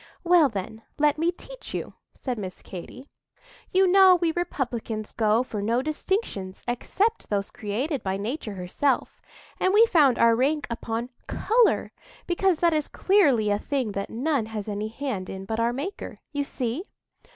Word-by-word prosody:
"Well, 340 -5 +5
then, 220 +1 -6 0.2
let 300 0 +2
me 335 +2 +2
teach - - -10
you," - - -4 0.2
said 250 -4 -4
Miss 185 -3 -7
Katy. 250 +9 -9 0.6
"You 380 +1 +4
know 375 0 +7
we 340 -2 +1
republicans 240 -10 -3
go 220 +1 +2
for 215 -5 -5
no 230 +5 +1
distinctions 305 - -3
except 400 - -1
those 200 -1 -1
created 250 +8 -2
by 190 0 -2
Nature 215 +1 -4
herself, 185 +10 -1 0.4
and 375 +2 +2
we 450 +2 +8
found 295 - +4
our 230 0 +5
rank 285 +5 +1
upon 230 +1 -3 0.2
colour, 460 +1 +2 0.3
because 360 0 +2
that 340 -1 +4
is 305 -1 0
clearly 280 - +3
a 205 - +1
thing 260 -5 -2
that 200 0 -4
none 260 -1 0
has 220 -2 -5
any 210 0 -3
hand 220 -5 -4
in 190 0 -6
but 220 +3 -3
our 230 +1 +2
Maker. 290 +11 -5
You 285 -1 -1
see?" 260 - -3
255 Hz, 165 wpm, -26 LUFS, 215-335 Hz, 0.6 s, we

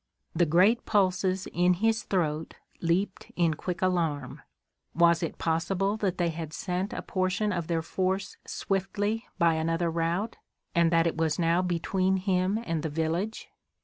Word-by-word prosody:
The 175 - +3
great 185 +9 +4
pulses 190 -2 +1
in 180 +1 +3
his 225 +4 +1
throat 160 -4 -1 0.3
leaped 180 +4 -1
in 170 -2 +2
quick 180 +3 -4
alarm. 165 -7 -1 0.5
Was 170 0 +4
it 165 - -3
possible 180 +5 0
that 195 -4 -1
they 175 -1 +1
had 160 -1 -6
sent 185 +4 -2
a - - -5
portion 185 +2 0
of 170 -3 -3
their 165 -2 0
force 190 +3 -1
swiftly 205 +3 -2
by 170 -1 +4
another 165 +1 0
route, 170 +7 -1 0.4
and 170 -1 +4
that 165 0 +4
it 165 - 0
was 160 -2 +1
now 170 +1 +2
between 185 +2 0
him 185 +1 +1
and 165 -2 -1
the 160 - -2
village? 165 +8 -2
180 Hz, 155 wpm, -28 LUFS, 165-190 Hz, 0.5 s, great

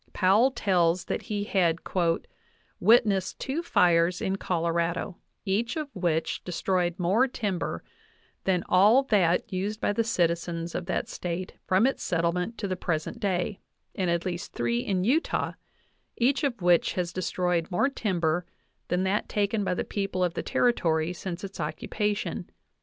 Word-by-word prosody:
Powell 205 +8 +4
tells 180 -7 +1
that - - -2
he 205 -2 -3
had 175 -5 +2 1.0
"witnessed 210 -5 +3
two 280 +5 -2
fires 175 - +3
in 190 - -1
Colorado, 170 0 -1 0.3
each 215 - 0
of 305 -2 -3
which 165 -3 -1
destroyed 180 0 -1
more 195 +8 +3
timber 195 - -3 0.6
than 180 -2 +2
all 210 +9 +5
that 190 -8 +2
used 205 +4 -2
by 205 - +1
the 230 - +1
citizens 170 -5 -1
of 175 - -4
that 185 - -1
State 175 +1 -4
from 190 +5 +4
its 270 - 0
settlement 180 +5 -1
to 205 - -3
the 185 - -1
present 170 +5 -3
day, 195 -1 -1 0.3
and 185 -2 -1
at 170 +1 0
least 175 -2 -4
three 120 0 0
in 185 +7 -1
Utah, 275 - +1 0.7
each 265 +5 +2
of 240 -9 -1
which 175 -1 +4
has 180 -1 -2
destroyed 180 -2 -1
more 185 +9 +2
timber 175 - -1 0.4
than 180 +1 0
that 195 +2 0
taken 205 +1 0
by 180 - 0
the - - -1
people 195 -2 -2
of 175 -2 0
the - - -2
Territory 165 -8 +1
since 175 0 -6
its 195 -1 -7
occupation. 205 +7 -2
185 Hz, 150 wpm, -27 LUFS, 170-210 Hz, 1.0 s, all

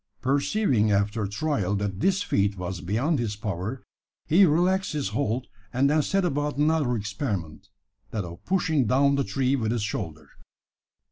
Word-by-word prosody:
Perceiving 135 - +2
after 105 +1 +1
trial 105 -4 -1
that 100 -2 -2
this 195 - +2
feat 100 - +1
was 90 0 -4
beyond 125 - 0
his 110 -3 -2
power, 105 +4 -4 0.4
he 180 +4 +5
relaxed 180 +5 +2
his 145 -2 -1
hold, 130 -2 -1 0.3
and 130 +3 +2
then 155 0 +3
set 195 +5 +1
about 145 -2 -1
another 150 -4 +2
experiment 100 - -4 0.4
that 105 -4 -3
of 85 0 -10
pushing 165 - +1
down 140 +4 +3
the 140 0 +1
tree 135 0 0
with 110 -4 -1
his 115 -3 -1
shoulder. 80 -7 -4
125 Hz, 155 wpm, -26 LUFS, 100-150 Hz, 0.4 s, he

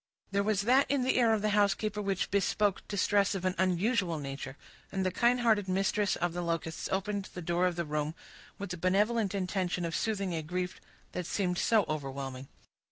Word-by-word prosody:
There 200 0 +2
was 205 -1 +1
that 255 +6 +4
in 275 -2 +2
the 255 - +2
air 235 -2 +4
of 215 -2 +1
the 215 - +2
housekeeper 210 +1 +1
which 195 -2 -1
bespoke 200 0 +1
distress 200 0 +2
of 185 -1 -3
an 185 - +2
unusual 185 -1 +1
nature, 135 -1 -6 0.3
and 190 -1 -1
the 185 - +1
kind 240 +5 +3
hearted 215 -4 +3
mistress 195 +2 +1
of 175 -1 -1
the 175 - -3
Locusts 165 -1 -3
opened 195 +1 -1
the - - -4
door 175 +2 +2
of 180 - -2
the 170 0 -2
room, 150 +1 -2 0.4
with 200 -2 -5
the 180 - -3
benevolent 200 +4 +1
intention 185 -2 -1
of 165 -1 -3
soothing 200 -4 -1
a 160 - -1
grief 180 +3 -4 0.3
that 180 -2 -4
seemed 180 -3 0
so 220 -4 +3
overwhelming. 135 -3 -4
190 Hz, 195 wpm, -31 LUFS, 175-205 Hz, 0.4 s, that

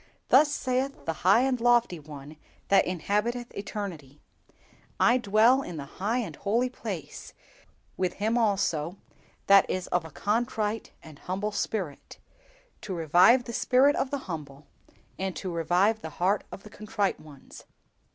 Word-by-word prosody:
"_Thus 290 +4 +7
saith 270 -1 -2
the 165 - -1
high 195 +6 +5
and 255 -2 0
lofty 240 -7 +3
One 150 0 -11 0.3
that 200 - +4
inhabiteth 210 +7 -2
eternity; 175 -9 -6 0.8
I 245 +2 +4
dwell 225 +4 +4
in 175 -10 -7
the 140 - -6 0.2
high 220 +5 +1
and 240 -4 -3
holy 235 +5 0
place, 200 - -7 0.6
with 180 -1 -1
him 220 +3 -1
also 195 -7 0 0.5
that 195 -1 +6
is 185 -1 -2
of 180 -1 +1
a 160 - -9
contrite 215 - -2
and 155 -3 -13
humble 195 +3 -3
spirit, 195 -7 -4 0.6
to 195 -3 -5
revive 180 - +5
the 235 - -8
spirit 265 +5 +3
of 270 - -1
the 285 - -2
humble, 150 -4 -7 0.5
and 190 -1 -3
to 185 - -5
revive 180 +7 +1
the 160 - -6
heart 190 +3 +1
of 195 - -9
the 210 - -13
contrite 210 -2 -2
ones. 145 -3 -14
200 Hz, 150 wpm, -27 LUFS, 175-235 Hz, 0.8 s, Thus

